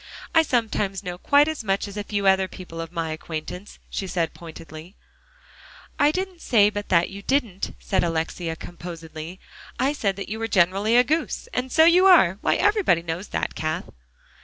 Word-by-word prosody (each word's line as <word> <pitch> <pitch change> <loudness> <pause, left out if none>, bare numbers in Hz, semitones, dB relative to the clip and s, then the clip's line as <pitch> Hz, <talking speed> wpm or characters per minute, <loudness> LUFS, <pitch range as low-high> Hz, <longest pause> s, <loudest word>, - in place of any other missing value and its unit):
"I 325 - +7
sometimes 215 -8 -1
know 180 -2 -6
quite 285 +7 +4
as 315 -6 -3
much 195 0 0
as 200 - -9
a 205 - -3
few 205 -1 -2
other 190 0 +4
people 170 -3 -8
of 165 0 -7
my 165 -2 -3
acquaintance," 165 +5 -7
she 195 - -4
said 170 -3 -1
pointedly. 165 +2 -11 1.0
"I 290 - +5
didn't 370 +1 -3
say 210 -3 +4
but 205 0 -5
that 175 0 +3
you 200 +1 -8
did," 225 -6 -1
said 190 - 0
Alexia 165 0 -2
composedly. 165 0 -9 0.4
"I 270 +3 +1
said 200 -9 -1
you 220 +2 -5
were 225 - -2
generally 195 +4 +3
a 245 - +7
goose. 315 - -2
And 255 +1 -2
so 320 +4 +6
you 360 +3 +6
are. 200 - +6
Why, - - +2
everybody 405 - +2
knows 170 +4 -4
that, - - -3
Cath." 155 +2 -3
195 Hz, 180 wpm, -24 LUFS, 170-245 Hz, 1.0 s, I